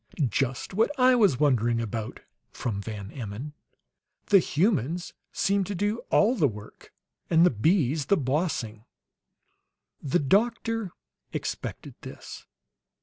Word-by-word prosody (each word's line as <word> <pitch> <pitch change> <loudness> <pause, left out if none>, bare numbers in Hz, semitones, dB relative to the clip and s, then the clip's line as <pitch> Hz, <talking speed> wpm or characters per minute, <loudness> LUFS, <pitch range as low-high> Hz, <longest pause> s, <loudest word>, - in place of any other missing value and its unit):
"Just 130 - -2
what 220 +4 +2
I 255 0 +6
was 200 - +3
wondering 120 -5 +2
about," 110 -1 -4 0.3
from 105 -5 -4
Van 100 -2 -7
Emmon. 120 +4 -7 0.8
"The 200 - +7
humans 170 - 0 0.2
seem 200 0 +1
to 200 - -4
do 205 +5 -1
all 215 +4 +4
the 165 - +3
work, 105 -3 -10 0.4
and 165 +1 +5
the - - +4
bees 145 - +1
the 200 - +4
bossing!" 130 -6 -2 1.2
The 140 +3 +1
doctor 225 - +1 0.4
expected - - -5
this. - - -10
150 Hz, 120 wpm, -27 LUFS, -, 1.2 s, The